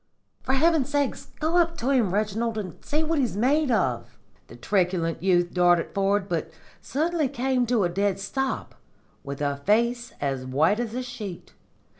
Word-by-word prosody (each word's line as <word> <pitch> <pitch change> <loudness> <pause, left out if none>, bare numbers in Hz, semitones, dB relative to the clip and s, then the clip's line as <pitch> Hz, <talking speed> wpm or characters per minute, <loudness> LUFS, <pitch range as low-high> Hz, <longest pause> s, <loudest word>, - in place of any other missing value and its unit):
'For 265 - -1
heaven's 300 -1 +3
sake, 285 -1 +1 0.3
go 320 +3 +1
up 335 -1 +2
to 255 +4 0
him, 240 -9 +2
Reginald, 215 +3 -1
and 190 -5 -6
see 305 +2 0
what 320 -1 0
he's 245 -7 0
made 280 +6 +2
of.' 235 - 0 0.3
"The - - -12
truculent 180 -4 0
youth 175 -2 +2
darted 175 -2 +3
forward, 195 0 +1
but 170 -3 -2 0.3
suddenly 315 -1 0
came 255 -1 0
to 235 -4 +2
a - - +3
dead 195 +2 0
stop, 265 +7 -3 0.5
with 140 0 -6
a 140 -1 0
face 235 +9 +1
as 135 -2 -2
white 155 - +2
as 235 -1 -3
a 255 - -2
sheet. 220 -8 -8
220 Hz, 170 wpm, -25 LUFS, 180-270 Hz, 0.5 s, heaven's